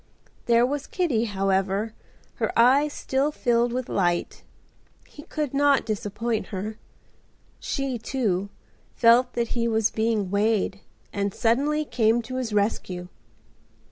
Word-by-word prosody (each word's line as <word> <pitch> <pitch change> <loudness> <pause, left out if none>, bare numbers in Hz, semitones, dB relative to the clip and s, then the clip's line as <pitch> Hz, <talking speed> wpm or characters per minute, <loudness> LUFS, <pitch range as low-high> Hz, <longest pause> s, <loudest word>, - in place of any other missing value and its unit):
There 235 0 +5
was 285 +2 -3
Kitty, 285 - 0
however, 195 +1 0 0.4
her - - 0
eyes 270 +5 +5
still 275 +1 -1
filled 240 -3 +1
with 250 0 -3
light. 175 -3 -1 0.7
He 295 - -12
could 295 -2 -4
not 280 0 +3
disappoint 215 +1 -2
her. 210 +2 -5 0.8
She, 275 -4 -3
too, 205 -6 -1 0.5
felt 245 +2 +5
that 235 -1 -1
he 235 -1 0
was 220 -2 +1
being 220 -4 0
weighed 205 -1 +1 0.3
and 200 -1 -2
suddenly 285 +6 +1
came 230 -2 +2
to 255 +3 -5
his 250 -4 -3
rescue. 190 -4 -1
230 Hz, 125 wpm, -25 LUFS, 205-255 Hz, 0.8 s, There